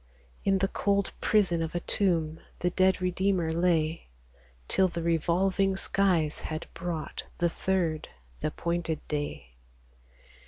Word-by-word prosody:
In 195 -1 +3
the 195 +1 +2
cold 200 0 0
prison 190 -6 +3
of 165 +1 -3
a - - +1
tomb 165 -4 +1 0.2
The 180 - +1
dead 185 0 +3
Redeemer 180 -2 +1
lay, 165 -2 +1 0.6
Till 190 - +3
the 170 -2 -4
revolving 185 +4 +2
skies 180 -7 +1
had 155 0 -4
brought 165 -4 -4
The 170 - +2
third, 170 -3 -1 0.3
th' - - -2
appointed 170 0 -2
day. 145 - -4
175 Hz, 125 wpm, -29 LUFS, 160-190 Hz, 0.6 s, In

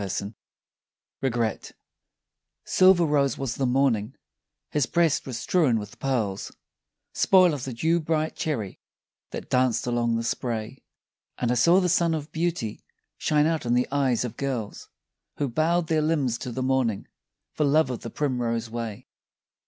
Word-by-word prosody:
100 100 +2 -3 0.9
REGRET 120 -4 -1 0.9
SILVER 185 -2 +5
rose 145 -3 +1
was 135 -3 -2
the 135 - -1
morning, 125 -3 +1 0.6
his 145 -5 +1
breast 170 -5 +1
was 125 -3 -4
strewn 145 -5 +2
with 105 -1 -7
pearls 115 -8 -2 0.6
Spoil 185 -3 +5
of 135 -4 -4
the 130 - -5
dew 160 +8 +1
bright 155 0 -1
cherry 115 -12 -3 0.5
that - - -7
danced 125 -2 +2
along 120 -1 0
the 115 - -1
spray, 115 +1 -3 0.6
And 120 -1 0
I - - +3
saw 170 +10 +5
the 180 - +1
sun 170 -1 +2
of 150 0 -6
beauty 160 -10 -2 0.4
shine 150 -1 +2
out 160 0 0
in 120 0 +1
the 125 - +2
eyes 135 -4 +1
of 120 -1 -7
girls 125 -7 -4 0.5
Who 145 - 0
bowed 160 +7 +1
their 160 -1 +1
limbs 145 -7 0
to 125 - -5
the 130 +2 -3
morning, 130 -5 0 0.5
for 150 - 0
love 145 -1 +3
of 125 - -4
the - - -6
primrose 120 -5 -2
way. 115 -3 -5
130 Hz, 155 wpm, -25 LUFS, 115-155 Hz, 0.9 s, SILVER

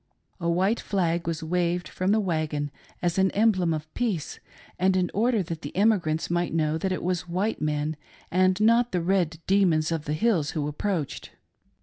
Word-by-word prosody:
A 170 -1 -1
white 190 +7 +2
flag 170 -4 -1
was 165 -1 -2
waved 175 +1 0
from 185 +2 -1
the 220 - +4
wagon 155 -6 -1 0.3
as 175 +1 +1
an 190 0 +4
emblem 200 -5 +3
of 155 0 -4
peace, 205 -11 -2 0.4
and 185 +1 +3
in 180 -2 0
order 225 -1 +2
that 165 -1 -6
the - - -7
emigrants 190 -7 +2
might 175 -1 -1
know 155 -1 +1
that 190 +3 -1
it 185 - -2
was 180 0 -2
white 190 +6 -1
men 150 0 -1 0.4
and 185 +2 +3
not 230 +2 +3
the 180 - +1
red 175 -3 +1
demons 175 -5 +3
of 160 -2 -2
the 150 - -2
hills 165 -3 +1
who 145 -1 -1
approached. 155 0 -3
175 Hz, 185 wpm, -26 LUFS, 160-195 Hz, 0.4 s, the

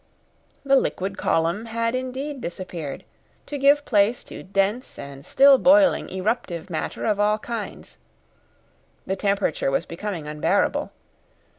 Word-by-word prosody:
The 275 0 +4
liquid 195 -6 -1
column 170 +5 0
had 230 +1 -1
indeed 260 +2 -4
disappeared, 170 -5 -6 0.4
to 290 - -5
give 285 +2 +4
place 210 +2 +2
to - - -9
dense 200 +6 -1
and 140 -1 -9
still 275 - +6
boiling 290 +1 +5
eruptive 190 -3 -3
matter 160 - -3
of 210 -2 +1
all 210 +1 +3
kinds. 225 -1 -7 1.1
The 190 - -1
temperature 200 -7 0
was 135 +5 0
becoming 170 -3 -5
unbearable. 150 0 0
205 Hz, 125 wpm, -24 LUFS, 175-255 Hz, 1.1 s, still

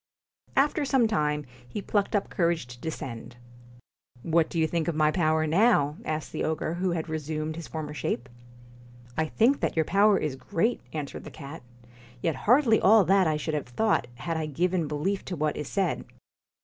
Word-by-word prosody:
After 290 +2 +3
some 265 -4 +3
time, 150 -8 0 0.2
he 125 - -5
plucked 205 +1 0
up 205 - -1
courage 170 -4 +1
to 120 0 -12
de 160 - -2
scend. 120 -5 -7 0.9
'What 165 -1 +2
do - - -5
you 160 - +3
think 165 0 -1
of 170 - 0
my 155 0 +3
power 155 -2 +2
now?' 155 -4 +3
asked 155 0 -3
the - - -3
ogre, 160 0 -1
who 180 +2 -1
had 165 -1 -3
resumed 155 0 -3
his 165 -1 -7
former 155 -2 -5
shape. 125 -4 -3 0.5
* 120 0 -21 0.3
I 160 - +1
think 245 - +3
that - - -1
your 160 -1 +2
power 200 +3 +4
is 150 -6 -2
great,' 170 - -1
answered 150 -3 -5
the - - -8
cat, 145 +1 -9 0.6
'yet 160 +4 0
hardly 245 -3 +5
all 215 +1 +7
that 195 -2 +4
I 155 -1 +1
should 155 +1 -3
have 150 -4 -2
thought 125 - +1
had 165 +6 -3
I 155 -1 -2
given 175 +2 0
belief 165 +7 -1
to 180 - -4
what 155 -1 0
is 150 - -4
said.' 195 -4 -1
160 Hz, 195 wpm, -27 LUFS, 150-195 Hz, 0.9 s, all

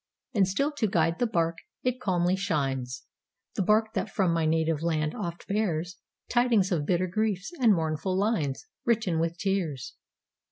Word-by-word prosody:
And 195 -4 +4
still 275 +11 0
to 220 - +2
guide 165 -3 +1
the 245 - +2
barque 170 -6 0 0.2
it 255 0 0
calmly 180 -1 +2
shines,—The 140 - -4
barque 215 +3 +3
that - - -1
from 185 -5 +1
my 165 -1 +1
native 160 -1 +1
land 155 -2 0
oft 175 -7 -5
bearsTidings 200 +3 0
of 155 -5 0
bitter 180 0 +2
griefs, 200 - -1
and 235 -4 +5
mournful 160 +3 -1
linesWritten 200 - 0
with 165 +1 -1
tears. 180 -10 -2
180 Hz, 145 wpm, -28 LUFS, 160-210 Hz, 0.2 s, and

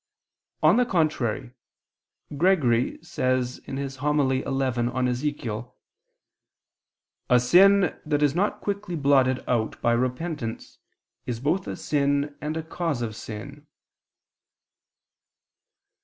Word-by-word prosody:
On 160 +8 +6
the 250 - +4
contrary, 135 - 0 0.8
Gregory 140 -8 +2
says 130 0 -1
on - - -5
Ezechiel 135 -3 0
(Hom. 125 -1 +1 0.5
xi): - - -32 1.6
"A 125 - +6
sin 185 +8 +5
that 150 -1 0
is 145 -2 +3
not 195 +6 0
quickly 200 -3 -3
blotted 135 -3 +3
out 115 -3 -1
by 120 - +2
repentance, 125 0 -3 0.5
is 120 -2 -3
both 160 +8 0
a - - -4
sin 145 0 0
and 155 +2 -3
a 160 - -3
cause 160 -5 -2
of 110 -2 -4
sin." 135 +8 -9
140 Hz, 105 wpm, -25 LUFS, 125-155 Hz, 1.6 s, On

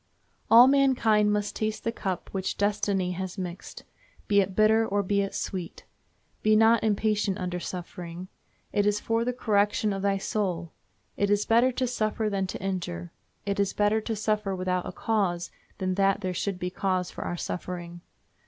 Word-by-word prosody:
All 235 +2 +9
mankind 250 -6 +4
must 210 0 -1
taste 215 0 -2
the 230 - 0
cup 190 -5 -4
which 190 -1 -3
destiny 200 -2 0
has 185 +1 -5
mixed, 180 -1 -7 0.4
be 200 -1 +5
it 190 -1 -3
bitter 220 +1 +4
or 205 -2 0
be 200 +1 +1
it 195 - -3
sweet. 180 -3 -5 0.6
Be 215 0 +4
not 225 +1 +5
impatient 210 -2 +1
under 180 -2 -3
suffering. 175 0 -7 0.5
It 205 0 +2
is 210 0 +2
for 225 +1 0
the 250 - 0
correction 210 -3 +1
of 195 - -3
thy 200 0 +1
soul. 185 -4 -2 0.5
It 200 - +1
is 205 0 +2
better 235 +3 +4
to 255 - 0
suffer 215 -2 -1
than 195 -1 -1
to - - -5
injure. 175 - -4 0.3
It 200 0 -1
is 200 -1 +1
better 210 +1 +2
to 225 +1 -3
suffer 210 -2 -1
without 185 -1 -1
a - - -4
cause 190 -6 -1 0.3
than 185 -1 -1
that 195 +1 +2
there 185 -2 -2
should 195 +1 -2
be 180 0 -3
cause 185 -1 -1
for - - -6
our 175 - -3
suffering. 175 -1 -5
200 Hz, 180 wpm, -27 LUFS, 185-215 Hz, 0.6 s, All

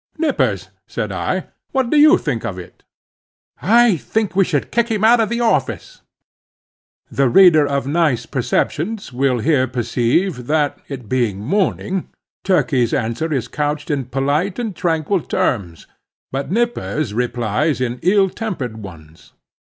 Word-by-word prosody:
"Nippers," 310 -1 0 0.2
said - - -4
I, - - -2 0.2
"what 265 -3 0
do 305 - +3
you 305 +4 +7
think - - -3
of - - -4
it?" - - -11 0.8
"I 235 -4 +4
think 215 +5 -2
I 195 - +4
should 165 -7 0
kick 235 0 +1
him 215 -2 -1
out 235 +2 +6
of 225 - +1
the 235 +1 -1
office." 240 - -1 1.1
(The 135 -2 +2
reader 160 -2 +6
of 140 -1 -1
nice 145 -5 +1
perceptions 155 - -2
will 130 0 +1
here 130 +1 +2
perceive 125 - -1
that, 150 -1 0
it 130 -5 -7
being 120 -5 0
morning, 190 - -1 0.3
Turkey's 140 - +1
answer 115 +9 -2
is 130 -5 -1
couched 150 +1 -2
in 140 -3 -1
polite 140 +9 -1
and 225 -6 -3
tranquil 165 +2 0
terms, 95 - -2 0.5
but 135 +1 -3
Nippers 195 - -1
replies 120 +4 -1
in 125 -1 -2
ill 195 +1 +3
tempered 175 - -5
ones. 85 -6 -13
150 Hz, 145 wpm, -19 LUFS, 125-195 Hz, 1.1 s, you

